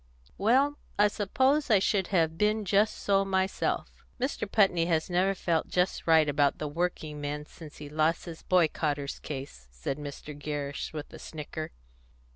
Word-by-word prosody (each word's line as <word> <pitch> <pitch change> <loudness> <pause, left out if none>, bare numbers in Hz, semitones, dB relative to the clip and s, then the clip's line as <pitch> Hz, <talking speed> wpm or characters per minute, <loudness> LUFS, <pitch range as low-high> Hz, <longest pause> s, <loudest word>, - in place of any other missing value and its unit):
Well, 270 +8 +3 0.2
I 205 0 +5
suppose 260 +9 +1
I 215 - +6
should 190 -1 +1
have 165 -4 +2
been 210 +3 +1
just 200 +3 +2
so 195 -1 +2
myself." 190 0 -1 0.2
"Mr. 245 -5 -2
Putney 190 -6 +4
has 165 +1 0
never 190 +2 +2
felt 170 -3 0
just 180 -1 0
right 160 -2 +6
about 145 0 +2
the 150 - -3
working 155 -1 -3
men 145 +1 -3
since 155 -1 -12
he 150 - -8
lost 155 +3 +1
the 165 -2 -9
boycotters' 155 -5 +1
case," 135 - -7
said - - -4
Mr. 145 0 -7
Gerrish, 145 -1 -4
with 150 -1 -7
a - - -9
snicker. 155 0 -6
165 Hz, 160 wpm, -29 LUFS, 150-195 Hz, 0.2 s, I